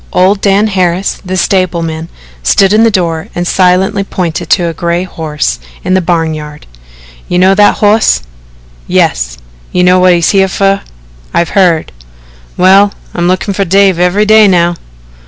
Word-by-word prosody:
Old 195 +2 +1
Dan 200 +1 +2
Harris, 185 -2 -1
the 185 0 -4
stableman, 170 -4 -1 0.3
stood 195 - +2
in 220 +1 +4
the 230 - +4
door 170 -6 -2
and 175 - -2
silently 185 +3 +1
he - - -5
pointed 175 -4 -4
to 175 - +2
a 165 - -3
gray 170 +2 -2
horse 150 - -4 0.2
in 185 - -1
the 185 - +2
barn 165 -2 -1
yard. 150 -1 -9 0.6
"You 180 - -1
know 185 +2 +4
that 205 +1 +3
hoss?" 210 - +2 0.6
"Yes." - - 0 0.3
"You 180 - +1
know 180 +1 +4
whut's 180 -2 +3
he 195 - +2
here 190 - +3
fer?" 195 +1 0 0.5
"I've 170 - +1
heard." 180 -5 +1 0.7
"Well, 195 +2 +4 0.2
I'm 175 0 -1
lookin' 185 +2 -1
fer 195 - -1
Dave 195 -1 +2
every 180 +4 +1
day 215 0 +5
now." 175 -2 +2
185 Hz, 165 wpm, -10 LUFS, 170-195 Hz, 0.7 s, day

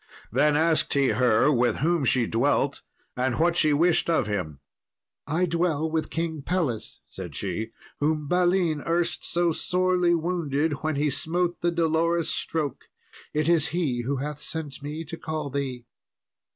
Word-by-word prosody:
Then 150 0 +3
asked 160 -1 +2
he 140 -1 +3
her 120 +4 +3
with 120 -4 +2
whom 160 +1 +1
she 125 -1 +3
dwelt, 135 +4 +1 0.3
and 125 -1 0
what 170 +1 +2
she 155 -3 +3
wished 165 +3 +3
of 165 -8 +2
him. 90 -9 -3 0.7
"I 160 +5 +1
dwell 165 -2 0
with 160 -1 -1
King 160 -2 -3
Pelles," 145 -9 -2
said - - -8
she, 100 +3 -3 0.3
"whom 150 0 0
Balin 175 -2 +2
erst 170 +1 0
so 175 0 +2
sorely 180 +1 +2
wounded 160 -3 0
when 155 -1 -1
he 145 +1 +1
smote 170 +5 -1
the 175 - +2
dolorous 165 0 +1
stroke. 150 -5 -3 0.5
It 155 0 0
is 165 -2 +3
he 135 -9 0
who 135 +4 -1
hath 145 +2 -4
sent 150 -4 -5
me 150 +3 -5
to 165 +2 -7
call 155 -4 -4
thee." 130 -3 -3
155 Hz, 155 wpm, -26 LUFS, 140-170 Hz, 0.7 s, Then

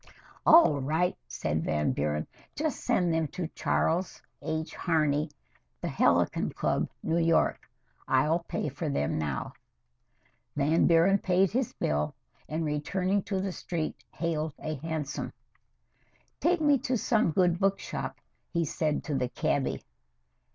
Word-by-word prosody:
"All 310 - +7
right," 160 +6 +1
said 75 +6 -2
Van 75 -1 +1
Buren. 75 +1 -1 0.3
"Just 305 0 -1
send 180 -9 +2
them 160 -1 +1
to 175 +3 -4
Charles 175 +2 0 0.2
H. 160 +1 -3
Harney, 155 -3 +1 0.5
The - - -3
Helicon - - +2
Club, - - 0
New 165 +1 +1
York. 165 -1 +2 0.4
I'll 150 +6 +3
pay 170 - -3
for 145 +3 -4
them 80 - 0
now." 75 -4 -3 1.0
Van 150 +3 +3
Buren 175 +4 +5
paid 185 0 +2
his 250 +2 -1
bill, 75 0 -1 0.3
and, 160 +1 -1
returning 180 +7 0
to 195 -2 -1
the 190 0 -2
street, 170 -3 -4
hailed 160 -3 -2
a 155 - -4
hansom. 155 -1 -4 1.1
"Take 350 -1 +2
me 290 -3 +4
to 255 0 0
some 220 -3 +2
good 175 +1 +2
book 195 0 +2
shop," - - -5 0.3
he 170 -1 0
said 155 0 -1
to 150 - -3
the 125 -2 0
cabby. 145 -1 -1
160 Hz, 135 wpm, -29 LUFS, 145-185 Hz, 1.1 s, All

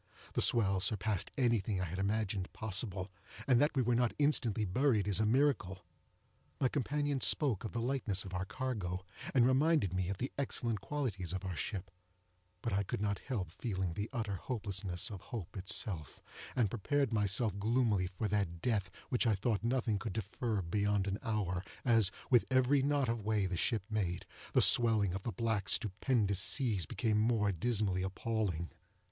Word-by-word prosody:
The - - +1
swell 100 -5 +3
surpassed 100 0 0
anything 115 -6 +1
I 95 - -1
had 90 +3 -5
imagined 100 -1 -1
possible, 100 -2 -2 0.3
and 125 -3 +4
that 150 +1 +2
we 130 - +3
were 120 +1 +2
not 120 0 +1
instantly 125 -8 +2
buried 110 0 +2
is 100 -1 +3
a 110 - +2
miracle. 110 -8 +1 0.7
My 130 - +2
companion 145 0 -1
spoke 135 - +2
of 110 - -4
the 115 - -2
lightness 115 -7 -1
of 95 - -8
our 90 +1 -2
cargo, 95 -5 -3 0.3
and 120 -2 +6
reminded 135 - +3
me 90 -1 -1
of 100 - -3
the 130 +6 -3
excellent 120 -6 -1
qualities 100 - -3
of 95 +1 -4
our 90 -2 -3
ship; 95 +2 -4 0.7
but 115 - -1
I 100 - +2
could 100 - -3
not 100 -2 -1
help 100 -11 -4
feeling 95 -3 -3
the 105 +5 -4
utter 110 -7 -2
hopelessness 100 -3 -2
of 100 -4 -7
hope 110 -9 -7
itself, 90 -4 -2 0.4
and 110 -5 +2
prepared 135 +3 0
myself 105 0 +1
gloomily 110 -3 +2
for 95 +4 -3
that 100 -5 -1
death 105 -3 0 0.2
which 125 -1 +1
I 110 - +3
thought 105 +2 -1
nothing 115 -4 0
could 95 0 -4
defer 110 0 -2
beyond 100 +3 +1
an 100 +1 -2
hour, 100 -7 -1 0.2
as, 115 -5 +5 0.2
with 120 -2 +5
every 130 +2 +3
knot 140 -1 +1
of 115 -2 -2
way 105 -2 +1
the 95 -1 -2
ship 110 +3 0
made, 100 -6 -2 0.3
the - - +5
swelling 110 -6 +5
of 95 - -3
the 115 - -3
black 110 0 -1
stupendous 105 -1 +2
seas 105 - +3
became 110 -3 0
more 110 -2 +2
dismally 100 -1 0
appalling. 95 -3 -2
105 Hz, 175 wpm, -34 LUFS, 95-120 Hz, 0.7 s, and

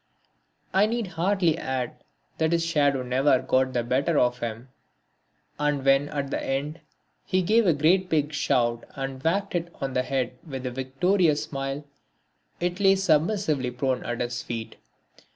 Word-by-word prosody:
I 195 +2 +4
need 230 0 -1
hardly 175 -1 +1
add 130 -2 -4 0.4
that 160 +1 +2
his 165 0 +1
shadow 145 -5 +2
never 130 +2 +3
got 130 0 +1
the 120 -1 0
better 140 +7 +1
of 125 -1 +2
him 115 +2 -5 0.9
and 145 -2 0
when 135 +1 +4
at 140 -1 -3
the - - -2
end 145 +4 -2 0.4
he 185 0 0
gave 220 +3 +3
a 170 - +5
great 180 +6 +3
big 150 -2 +1
shout 120 -4 +1
and 135 -1 -5
whacked 195 +7 0
it 170 -1 -2
on 135 -1 -3
the 125 - +2
head 125 -1 -2
with 135 -5 -6
a 125 - -2
victorious 150 +6 +1
smile, 135 +1 -4 0.7
it 175 +2 -2
lay 195 -1 +5
submissively 160 -5 +1
prone 125 +1 -1
at 120 0 -3
his 120 0 -2
feet. 115 -1 -6
140 Hz, 160 wpm, -26 LUFS, 130-170 Hz, 0.9 s, a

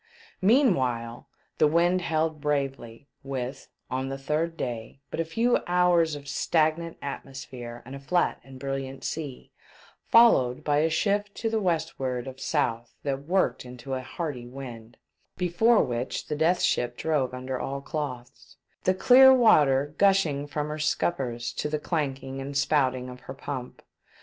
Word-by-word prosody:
Meanwhile, 130 - +2 0.3
the 155 - +6
wind 175 +4 +3
held 160 -2 -1
bravely, 135 -4 -2
with 135 0 -5
— - - -37
on 130 +1 -2
the 135 - -4
third 155 +4 -2
day 120 -1 -5
— - - -48
but - - -4
a - - +2
few 230 +10 +1
hours 175 -3 +3
of 140 -1 -10
stag 155 +3 +1
nant 165 -1 -7
atmosphere 130 -4 -7
and 130 - -9
a - - -7
flat 175 +6 0
and 135 -1 -12
brilliant 135 0 -4
sea, 145 -5 -5 0.6
followed 135 - +5
by 145 -1 +2
a 160 +2 +2
shift 205 +5 +1
into 225 +2 -3
the 225 - +1
westward 160 -8 -1
of 130 0 -8
south 120 -7 -1
that 140 -1 -3
worked 190 +2 +1
into 125 +1 -8
a 130 - -2
hearty 130 -2 -5
wind, 120 -3 -9 0.4
before 190 +6 +3
which 120 0 -3
the - - -3
Death 165 +4 +2
Ship 120 0 +1
drove 150 -6 0
under 130 0 -4
all 140 +1 -3
cloths, 140 -3 -6 0.3
the 185 - +3
clear 260 +6 +8
water 145 - +4
gushing 180 -8 +3
from 150 0 -3
her 155 +1 -4
scup 150 +3 +1
pers 120 -3 -4
to 150 - -3
the 150 - 0
clanking 135 -4 -3
and 140 +1 -4
spouting 130 -3 +1
of 125 0 -9
her 130 +1 -9
pump. 130 -2 -6
140 Hz, 165 wpm, -27 LUFS, 130-165 Hz, 0.6 s, clear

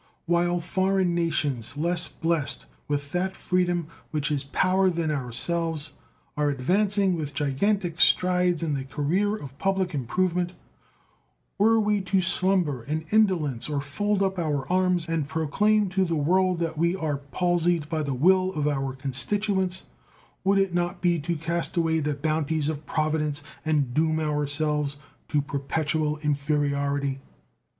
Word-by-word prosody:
While 175 +1 +2
foreign 190 +1 +1
nations 145 -7 -1
less 170 +2 +2
blessed 165 -3 -1 0.2
with 145 -1 -2
that 185 +3 -1
freedom 175 -2 0 0.2
which 150 -2 -1
is 145 -2 0
power 185 +6 +2
than 165 -3 -1
ourselves 150 +3 0 0.4
are 150 0 +1
advancing 190 +7 +1
with 150 -3 -5
gigantic 170 +5 0
strides 180 -2 +4
in 155 -3 0
the 135 -1 -2
career 175 +10 0
of 140 -8 -10
public 190 -2 0
improvement, 175 +6 0 1.1
were 225 +2 +5
we 210 -1 +1
to 190 +1 +1
slumber 180 -7 +1
in 155 +5 -3
indolence 175 - +2
or 145 -2 -1
fold 200 +9 -1
up 190 -1 -1
our 145 -5 -1
arms 180 -2 +2
and 165 -3 -1
proclaim 195 +7 +2
to 190 +1 +1
the 170 -2 -1
world 180 +4 +2
that 165 -2 -3
we 170 +2 +2
are 155 -6 -2
palsied 170 +2 0
by 160 0 -2
the 140 -3 -2
will 185 +6 +3
of 150 -2 -1
our 135 -2 -1
constituents, 185 - -1 0.6
would 195 +1 +3
it 195 -2 +1
not 175 +1 -1
be 175 -2 +2
to 170 +3 -2
cast 170 +2 -2
away 165 -1 +2
the 150 -1 -1
bounties 155 +1 0
of 155 -1 -5
Providence 150 -2 0 0.2
and 145 -6 0
doom 160 +2 +2
ourselves 150 -1 0 0.3
to 145 -2 +1
perpetual 150 +2 -1
inferiority? 140 -1 0
160 Hz, 145 wpm, -26 LUFS, 145-185 Hz, 1.1 s, were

